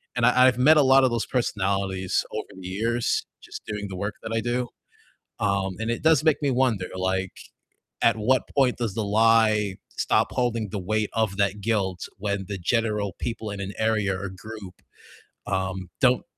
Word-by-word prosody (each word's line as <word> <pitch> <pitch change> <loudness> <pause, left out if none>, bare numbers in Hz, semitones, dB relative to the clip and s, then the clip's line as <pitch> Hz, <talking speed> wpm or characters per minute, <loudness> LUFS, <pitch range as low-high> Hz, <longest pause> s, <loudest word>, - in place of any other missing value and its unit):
and 120 -1 +2
I 125 +1 +6
I've 125 -2 +2
met 155 +5 +6
a 150 - +6
lot 135 0 +6
of 130 - +2
those 115 -2 -1
personalities 95 -5 -1
over - - -4
the 90 - -8
years 115 +5 0 0.2
just - - -9
doing 105 -1 -4
the 95 - -6
work 100 +3 -3
that 110 0 -4
I 115 - +1
do. 120 +2 -1 0.7
Um, 100 -2 0
and 110 +1 -1
it 120 - -3
does 160 -3 +4
make 155 -2 +3
me 140 -2 +1
wonder, 120 -8 +1
like, 95 0 -1 0.7
at - - +5
what 125 +4 +2
point 135 -3 +3
does 115 -5 -2
the 110 +1 -2
lie 110 -1 +3
stop - - +1
holding 115 -4 -1
the 105 - -4
weight 105 +3 -1
of 110 -4 0
that 100 0 0
guilt 95 -4 -1
when 100 -1 -2
the 100 -1 -5
general 105 -1 0
people 115 -2 -4
in 100 - -6
an 100 +1 -5
area 110 -3 +1
or 100 -1 -4
group, 95 0 -10 0.7
um, 95 -2 -2
don't 125 -1 +4
110 Hz, 185 wpm, -25 LUFS, 95-120 Hz, 0.7 s, I